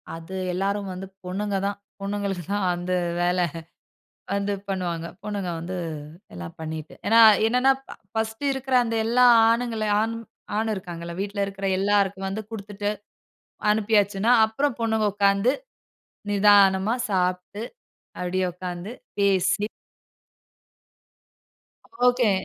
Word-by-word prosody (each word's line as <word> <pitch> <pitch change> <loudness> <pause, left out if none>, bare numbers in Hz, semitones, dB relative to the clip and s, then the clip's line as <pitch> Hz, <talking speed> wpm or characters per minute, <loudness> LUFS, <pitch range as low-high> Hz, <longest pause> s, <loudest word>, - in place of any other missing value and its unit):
அது 165 +3 -10 0.2
எல்லாரும் 200 +2 -1
வந்து 190 +1 -7 0.2
பொண்ணுங்க 200 +2 -2
தான் 200 0 -2 0.2
பொண்ணுங்களுக்கு 200 -3 -2
தான் 205 -2 0
அந்த 175 +1 -3 0.3
வேலை 180 0 +2 0.9
வந்து 200 0 0 0.2
பண்ணுவாங்க. 175 -3 -2 0.2
பொண்ணுங்க 200 -4 -3
வந்து 180 +3 -5 0.6
எல்லாம் 85 -1 -8
பண்ணிட்டு 160 -1 -6
ஏனா, 225 +2 +6 0.3
என்னன்னா 250 +3 +4 0.4
ஃபர்ஸ்ட் 220 +3 -2
இருக்கிற 265 -1 -1
அந்த 230 -1 -2
எல்லா 250 +2 +4 0.2
ஆணுங்கள, 230 -2 0 0.2
ஆண் 225 +1 -1 0.4
ஆண் 220 0 0
இருக்காங்கல்ல 170 -3 -6
வீட்டில 200 0 -2
இருக்கிற 195 0 -6
எல்லாருக்கும் 195 -1 +1
வந்து 210 +3 -4
குடுத்துட்டு 205 -1 -4 0.8
அனுப்பியாச்சுன்னா, 210 0 +2
அப்புறம் 245 +3 -1
பொண்ணுங்க 220 -1 +1
உட்காந்து 200 +4 +3 0.8
நிதானமா 200 +1 +5
சாப்ட்டு. 180 +3 -1 0.6
அப்படியே 185 +1 -1
உட்காந்து 180 +2 -6 0.3
பேசி 200 +1 +2 2.4
ஓகே 245 -3 +4
200 Hz, 105 wpm, -25 LUFS, 185-220 Hz, 2.4 s, ஏனா